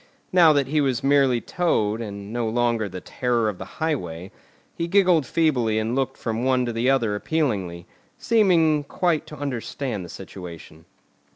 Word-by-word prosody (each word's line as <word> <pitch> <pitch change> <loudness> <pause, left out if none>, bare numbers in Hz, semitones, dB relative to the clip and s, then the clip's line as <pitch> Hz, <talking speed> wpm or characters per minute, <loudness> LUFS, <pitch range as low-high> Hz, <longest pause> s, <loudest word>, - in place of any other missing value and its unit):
Now 175 -3 +6
that 140 -2 +2
he 150 +3 +1
was 130 -4 0
merely 135 -3 +3
Toad, 115 -10 0
and 100 -1 -7
no 120 -2 -1
longer 115 -2 0
the 90 0 -7
Terror 120 -3 0
of 105 -4 -3
the - - -10
Highway, 95 - -3 0.4
he 170 - -2
giggled 180 -6 +3
feebly 125 -10 +1
and 110 +2 -1
looked 135 0 -1
from 115 0 -3
one 130 -1 +2
to 120 - -3
the 115 +3 +1
other 120 -6 +2
appealingly, 105 - -2 0.3
seeming 170 -9 +3
quite 165 +2 -1
to 150 - -10
understand 130 -5 -4
the 85 - -10
situation. 85 -4 -10
125 Hz, 165 wpm, -23 LUFS, 105-150 Hz, 0.4 s, Now